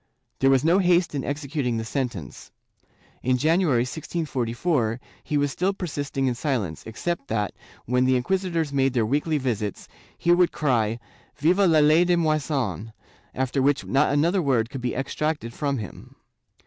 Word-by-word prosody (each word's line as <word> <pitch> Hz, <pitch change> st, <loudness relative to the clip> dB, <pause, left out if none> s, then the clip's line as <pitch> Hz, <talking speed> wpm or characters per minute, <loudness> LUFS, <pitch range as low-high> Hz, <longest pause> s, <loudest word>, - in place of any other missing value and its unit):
There 135 Hz, -, +4 dB
was 135 Hz, 0 st, +4 dB
no 175 Hz, +4 st, +4 dB
haste 175 Hz, -2 st, +3 dB
in 140 Hz, -2 st, -2 dB
executing 140 Hz, -4 st, -2 dB
the 115 Hz, -, -3 dB
sentence. 115 Hz, -, -5 dB, 0.7 s
In 125 Hz, 0 st, +1 dB
January, 155 Hz, -3 st, +2 dB
1644, 130 Hz, -4 st, -2 dB, 0.2 s
he 150 Hz, -, -1 dB
was 145 Hz, -1 st, +1 dB
still 185 Hz, +7 st, 0 dB
persisting 145 Hz, -7 st, -3 dB
in 130 Hz, -, +1 dB
silence, 115 Hz, -, -2 dB
except 140 Hz, +7 st, -3 dB
that, 105 Hz, -2 st, -1 dB, 0.3 s
when 125 Hz, +2 st, +2 dB
the 130 Hz, 0 st, +3 dB
inquisitors 165 Hz, +2 st, -1 dB
made 135 Hz, -1 st, +2 dB
their 120 Hz, -4 st, +2 dB
weekly 150 Hz, +6 st, 0 dB
visits, 115 Hz, -7 st, -3 dB, 0.3 s
he 170 Hz, -, +1 dB
would 175 Hz, 0 st, +4 dB
cry 115 Hz, -6 st, +1 dB, 0.4 s
"Viva 180 Hz, +6 st, +3 dB
la 160 Hz, -2 st, +4 dB
ley 155 Hz, +3 st, +5 dB
deMoisen," 150 Hz, -, 0 dB, 0.4 s
after 130 Hz, +1 st, 0 dB
which 140 Hz, +1 st, +2 dB
not 135 Hz, -, +2 dB
another 170 Hz, +6 st, +2 dB
word 125 Hz, -6 st, +1 dB
could 135 Hz, -2 st, -6 dB
be 120 Hz, 0 st, -2 dB
extracted 135 Hz, -1 st, -2 dB
from 140 Hz, -1 st, -1 dB
him. 105 Hz, -5 st, -9 dB
140 Hz, 155 wpm, -24 LUFS, 125-160 Hz, 0.7 s, ley